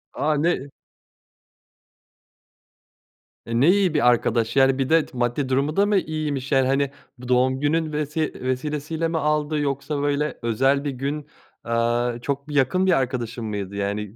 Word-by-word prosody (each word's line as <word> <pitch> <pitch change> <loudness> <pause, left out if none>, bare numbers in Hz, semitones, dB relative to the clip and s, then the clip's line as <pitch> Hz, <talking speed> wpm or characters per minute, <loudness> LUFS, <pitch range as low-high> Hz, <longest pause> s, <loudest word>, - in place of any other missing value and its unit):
A! 155 0 +1
Ne 150 -3 0 2.8
E, 115 0 -1
ne 150 - +6
iyi 195 -4 +2
bir 145 -6 +3
arkadaş! 115 0 +1
Yani 135 0 +4
bir 135 +1 -1
de 165 -1 +4
t 125 - -13
maddi 120 +3 -1
durumu 140 +4 0
da 200 +1 +4
mı 205 -1 +2
iyiymiş? 150 -5 -3
Yani 135 -1 +3
hani 135 0 +1 0.3
bu 125 0 -10
doğum 130 +1 +2
günün 155 +2 0
vesi 150 +1 -2
vesilesiyle 150 +5 -2
mi 165 0 -2
aldı? 150 0 0
Yoksa 140 +1 -2
böyle 145 +1 -1
özel 135 +5 +1
bir 145 - -2
gün, 140 +3 -4 0.4
aaa, 120 +1 0
çok 140 +2 -3
bir 150 - -6
yakın 165 +8 +2
bir 190 - +3
arkadaşın 125 -3 -1
mıydı 100 -2 -4
yani? 100 +1 -3
140 Hz, 160 wpm, -23 LUFS, 125-150 Hz, 2.8 s, ne